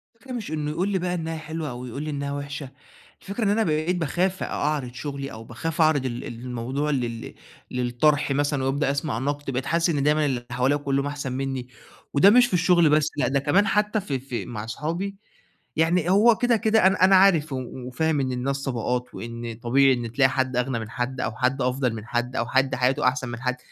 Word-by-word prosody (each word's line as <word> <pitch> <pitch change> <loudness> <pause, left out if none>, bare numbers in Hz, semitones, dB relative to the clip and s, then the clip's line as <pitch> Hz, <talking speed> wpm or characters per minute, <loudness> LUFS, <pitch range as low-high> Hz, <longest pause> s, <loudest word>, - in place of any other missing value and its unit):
الفكرة 255 +3 -13
مش 225 -9 -5
إنه 150 -1 -2
يقول 180 +6 -1
لي 190 -2 0
بقى 180 0 -2
إنها 165 -1 -3
حلوة 155 -1 -5
أو 125 +1 -7
يقول 135 +5 -5
لي 155 - -4
إنها 140 -1 -3
وحشة، 145 -1 -5 0.5
الفكرة 200 +4 -4
إن 200 - +2
أنا 220 +2 +2
بقيت 155 +1 0
باخاف 180 +4 -1
أعرض 140 -4 -2
شغلي، 140 0 -5
أو 110 0 -9
باخاف 150 +8 -3
أعرض 155 -4 +3
ال 120 -1 -3
الموضوع 125 +4 -4
لل 120 -4 -3 0.4
للطَرح 125 +4 +1
مثلًا 145 -1 0
وأبدأ 135 +1 +1
أسمع 140 -5 -2
نقد 145 +1 -2
بقيت 130 +1 -2
حاسس 170 +1 +1
إن 145 -4 0
دايمًا 150 +1 +3
اللي 125 -3 -2
حواليّا 130 +3 +2
كلّهم 140 -1 -1
أحسن 140 -3 -4
مني، 135 -2 -3 0.5
وده 170 +8 +7
مش 245 +3 +7
في - - -8
الشغل 175 -2 +4
بس 150 0 +3
لأ 145 - +2
ده 140 +1 +1
كمان 185 +10 +3
حتى 210 0 +1
في 140 -8 -3
في 125 -2 -5
مع 105 -3 -6
أصحابي 165 - -3 0.6
يعني 165 +1 +2
هو 220 +3 +6
كده، 245 -2 +3
كده 220 -3 +4
أنا، 190 -1 +2
أنا 190 0 +6
عارف 170 -7 +4
و - - -1 0.3
وفاهم 155 +3 0
إن 130 -1 -1
الناس 135 +2 -2
طبقات، 125 0 -2
وإن 115 0 -6
طبيعي 135 +2 +4
إن 120 -2 -3
تلاقي 130 +2 +4
حد 130 -1 -1
أغنى 125 -1 0
من 110 0 -6
حد 130 +2 -3
أو 110 - -1
حد 130 +1 +1
أفضل 125 -1 0
من 110 -1 -7
حد 120 +2 -2
أو 120 - 0
حد 130 +1 +2
حياته 125 0 +2
أحسن 125 -1 0
من 115 +1 -6
حد 125 0 -1
140 Hz, 215 wpm, -24 LUFS, 125-165 Hz, 0.6 s, وده